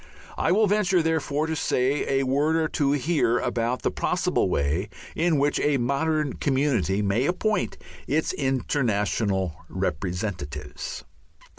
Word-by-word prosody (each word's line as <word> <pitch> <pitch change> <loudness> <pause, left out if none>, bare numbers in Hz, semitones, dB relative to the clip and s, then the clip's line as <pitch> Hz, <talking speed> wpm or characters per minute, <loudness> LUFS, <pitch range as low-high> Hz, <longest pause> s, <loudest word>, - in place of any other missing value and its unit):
I - - +1
will 215 +4 +4
venture, 195 -4 +2
therefore, 160 -2 0
to 160 0 -2
say 135 0 +1
a - - -1
word 145 +5 +2
or 160 -1 +2
two 145 -3 +1
here 145 -4 +2
about 120 +1 -1
the - - +1
possible - - 0
way 80 +8 0 0.3
in 165 -2 +2
which 145 +1 +1
a 145 -1 +2
modern 140 +3 0
community 125 - +1
may 105 +7 +1
appoint 210 +4 0 0.3
its 155 +3 0
international 105 - 0
representatives. 90 -3 -4
135 Hz, 130 wpm, -25 LUFS, 105-155 Hz, 0.3 s, will